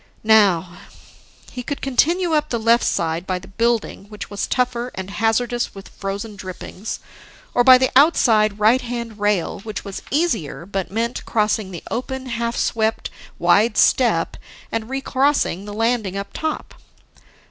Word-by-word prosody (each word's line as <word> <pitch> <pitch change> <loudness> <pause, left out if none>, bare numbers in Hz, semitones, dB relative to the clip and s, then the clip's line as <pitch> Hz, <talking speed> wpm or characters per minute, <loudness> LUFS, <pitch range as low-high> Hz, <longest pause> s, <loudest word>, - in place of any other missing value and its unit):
Now: 195 -5 +4 0.7
He 250 - -5
could 280 +3 -4
continue 330 +6 +1
up 300 0 +1
the 235 - 0
left 230 +1 +3
side, 165 +2 -1
by 185 - 0
the 180 - -11
building, 230 0 -1
which 210 0 -9
was 205 - -2
tougher 250 -1 0
and 190 +1 -6
hazardous 225 +3 0
with 195 - -10
frozen 200 +2 -5
drippings, 190 +2 -7 0.5
or 245 - +4
by 255 0 +9
the 260 0 +1
outside, 225 -8 +4
right 220 +5 +4
hand 235 -3 -5
rail, 205 -4 0
which 215 +1 -6
was 195 -1 -6
easier 235 - -1
but 195 -1 -3
meant 230 +4 -2
crossing 215 -2 0
the 175 -3 -8
open, 260 +2 -3
half 235 -1 -2
swept 220 0 0 0.3
wide 220 +4 +3
step - - +3 0.3
and 225 0 -3
recrossing 270 -7 0
the 205 - -7
landing 225 -3 0
up 200 - -6
top. 315 -1 -4
225 Hz, 150 wpm, -21 LUFS, 200-245 Hz, 0.7 s, by